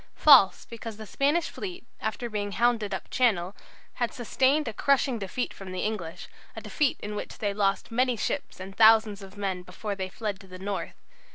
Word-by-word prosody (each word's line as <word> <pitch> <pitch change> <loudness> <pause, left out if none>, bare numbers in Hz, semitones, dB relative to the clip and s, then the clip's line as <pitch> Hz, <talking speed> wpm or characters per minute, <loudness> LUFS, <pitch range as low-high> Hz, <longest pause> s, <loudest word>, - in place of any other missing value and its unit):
False, 200 -10 +7
because 230 -2 -8
the 220 - -8
Spanish 290 - +1
fleet, 365 -8 -7
after 220 +2 -3
being 205 -2 -3
hounded 230 -3 +1
up 190 - -4
Channel, 200 -7 +1 0.5
had 240 - +1
sustained 265 +5 +1
a 225 - -3
crushing 265 -1 +2
defeat 205 +5 -3
from 195 -1 -9
the 185 - -3
English, 205 -7 -4 0.3
a - - -6
defeat 295 -4 0
in 210 - -5
which 210 - -6
they 205 -2 -1
lost 200 +2 0
many 250 +1 +1
ships 275 +2 -3
and 190 +1 -8
thousands 220 -2 +5
of 195 +1 -12
men 190 -3 -2
before 185 +4 -5
they 190 -1 -4
fled 205 -1 -4
to 190 - -15
the 185 0 -10
north.... 195 +1 -4
210 Hz, 190 wpm, -27 LUFS, 195-240 Hz, 0.5 s, False